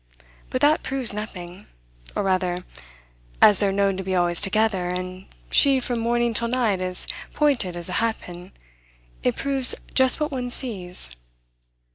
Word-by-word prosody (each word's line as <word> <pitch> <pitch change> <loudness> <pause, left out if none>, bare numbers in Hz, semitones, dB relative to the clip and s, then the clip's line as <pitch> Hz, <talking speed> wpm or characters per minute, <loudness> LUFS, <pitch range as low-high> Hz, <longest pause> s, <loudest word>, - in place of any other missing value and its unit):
But 255 - -2
that 300 +2 +4
proves 260 -4 -2
nothing 195 -2 -7 0.5
or - - 0
rather, 180 -2 0 0.7
as 205 - +7
they're 200 -2 +2
known 195 -1 +1
to 190 - -4
be 190 0 -2
always 175 -1 +1
together, 205 -2 +1
and 185 +1 -5 0.2
she 275 -2 +6
from 245 -1 -2
morning 235 0 +1
till 235 +2 +1
night 230 -6 +1
as 185 0 +1 0.3
pointed 245 - +1
as 170 - -6
a - - -6
hat 230 -1 0
pin, 175 +1 -11 0.7
it 125 - +1
proves 270 -2 0 0.2
just 260 +2 +4
what 300 -1 -1
one 250 -2 -3
sees. 185 - -3
205 Hz, 155 wpm, -24 LUFS, 185-245 Hz, 0.7 s, as